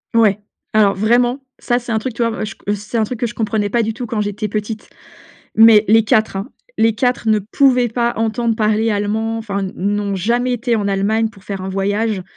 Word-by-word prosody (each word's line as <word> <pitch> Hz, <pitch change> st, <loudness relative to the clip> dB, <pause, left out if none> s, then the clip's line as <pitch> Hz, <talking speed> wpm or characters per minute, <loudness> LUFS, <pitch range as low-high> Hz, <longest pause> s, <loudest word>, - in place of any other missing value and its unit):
Ouais. 210 Hz, -3 st, +4 dB, 0.3 s
Alors 205 Hz, -2 st, +4 dB
vraiment, 240 Hz, +5 st, +2 dB, 0.2 s
ça 240 Hz, 0 st, 0 dB
c'est 235 Hz, -1 st, -7 dB
un 220 Hz, -, +1 dB
truc 250 Hz, +2 st, -4 dB
tu 235 Hz, -, -5 dB
vois? 230 Hz, -, +2 dB
Moi 220 Hz, -, -4 dB
je -, -, -7 dB, 0.2 s
c'est 205 Hz, +3 st, -5 dB
un -, -, +3 dB
truc 230 Hz, +2 st, -5 dB
que 245 Hz, -, 0 dB
je 235 Hz, -, -8 dB
comprenais 215 Hz, -2 st, -1 dB
pas 235 Hz, -, +2 dB
du 225 Hz, 0 st, -2 dB
tout 245 Hz, -, -5 dB
quand 215 Hz, -1 st, -2 dB
j'étais 210 Hz, +1 st, -3 dB
petite. 215 Hz, +1 st, -4 dB, 0.7 s
Mais 220 Hz, -1 st, +7 dB
les 225 Hz, +1 st, +5 dB
4 215 Hz, -2 st, +1 dB
hein! 195 Hz, +6 st, -4 dB, 0.3 s
Les 225 Hz, -1 st, +4 dB
4 245 Hz, 0 st, 0 dB
ne 215 Hz, -1 st, +3 dB
pouvaient 250 Hz, +3 st, +2 dB
pas 235 Hz, +1 st, 0 dB
entendre 225 Hz, +1 st, 0 dB
parler 220 Hz, 0 st, +1 dB
allemand 220 Hz, +2 st, -1 dB
enfin, 200 Hz, -3 st, -3 dB
n'ont 200 Hz, +1 st, -1 dB
jamais 240 Hz, +6 st, 0 dB
été 240 Hz, 0 st, 0 dB
en 205 Hz, -2 st, -1 dB
Allemagne 205 Hz, +3 st, +1 dB
pour 195 Hz, -3 st, -18 dB
faire 195 Hz, -2 st, -5 dB
un 190 Hz, -, -5 dB
voyage. 200 Hz, +1 st, -1 dB
220 Hz, 220 wpm, -18 LUFS, 205-235 Hz, 0.7 s, Mais